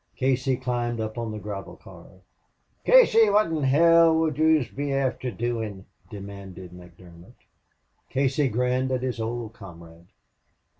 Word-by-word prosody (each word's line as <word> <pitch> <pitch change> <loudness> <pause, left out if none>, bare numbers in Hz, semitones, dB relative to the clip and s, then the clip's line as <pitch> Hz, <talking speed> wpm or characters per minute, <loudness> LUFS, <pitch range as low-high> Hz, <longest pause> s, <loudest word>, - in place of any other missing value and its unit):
Casey 130 0 0
climbed 120 -2 -3
up 110 0 -4
on 115 -1 -4
the 110 - -6
gravel 100 -2 -7
car. - - -15 0.8
"Casey, 340 - +6
wot 205 -3 +2
in 160 -2 -2
hell 165 +4 +5
would 160 -3 0
yez 155 -4 +3
be 145 0 -4
afther 130 -2 -1
doin'?" 110 -3 -4 0.2
demanded 100 -3 -10
McDermott. 90 -1 -15 0.7
Casey 135 +1 0
grinned 125 +2 0
at 130 -1 -1
his 125 -3 -3
old 115 0 -4
comrade. 85 -5 -14
120 Hz, 135 wpm, -25 LUFS, 100-140 Hz, 0.8 s, Casey